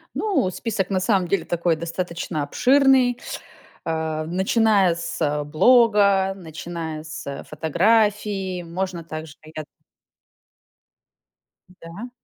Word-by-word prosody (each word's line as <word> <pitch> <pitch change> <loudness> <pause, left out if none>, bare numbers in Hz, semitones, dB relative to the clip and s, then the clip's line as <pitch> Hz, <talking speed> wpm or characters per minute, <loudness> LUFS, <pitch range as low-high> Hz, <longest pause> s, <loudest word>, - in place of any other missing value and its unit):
Ну, 385 - 0
список, 200 -1 -3
на 190 - +1
самом 185 -1 +1
деле, 195 - 0
такой, 170 -1 0
достаточно 165 -1 -4
обширный, 260 - +3 0.7
а, 160 -1 -2
начиная 190 +1 +2
с, 150 -3 -2
блога, 200 - +4
начиная 160 -2 -7
с 140 -3 -7
фотографии. 195 +3 +1
Можно 175 0 -4
также 155 -1 -8 0.2
я 155 - -4 2.1
Да. 180 +6 -10
180 Hz, 95 wpm, -22 LUFS, 160-205 Hz, 2.1 s, блога